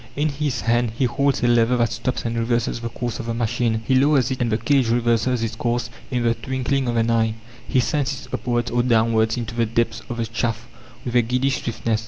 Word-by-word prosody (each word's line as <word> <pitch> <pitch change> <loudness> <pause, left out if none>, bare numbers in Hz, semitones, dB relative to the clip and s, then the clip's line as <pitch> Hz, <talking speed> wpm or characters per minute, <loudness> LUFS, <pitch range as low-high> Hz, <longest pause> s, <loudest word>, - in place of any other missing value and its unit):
In 150 +2 +1
his 140 -5 -2
hand 115 +1 +1
he 130 - +2
holds 140 +2 +1
a - - +4
lever 120 +1 +3
that 120 -1 +1
stops 130 +1 -3
and 115 0 -1
reverses 115 0 0
the 115 0 -4
course 120 0 -4
of - - -5
the 115 - -2
machine; 115 -1 0
he 135 - +1
lowers 135 -1 +3
it 130 - -3
and 120 -2 +1
the 110 - +2
cage 120 +1 +2
reverses 120 0 +1
its 115 -1 -2
course 120 +1 -1 0.2
in 125 -3 -1
the 115 -1 +3
twinkling 130 +2 -2
of 120 - 0
an 115 0 +2
eye; 115 -1 +2 0.3
he 130 - +2
sends 140 +1 0
it - - -18
upwards 120 -1 -1
or 120 +1 +2
downwards 115 -1 +2
into 120 -1 -4
the 115 -1 +1
depths 115 0 0
of 120 - -4
the 115 - -1
shaft 115 -1 -1 0.4
with 120 -1 -3
a 120 - +6
giddy 125 +4 0
swiftness. 115 -3 -1
120 Hz, 235 wpm, -22 LUFS, 115-125 Hz, 0.4 s, a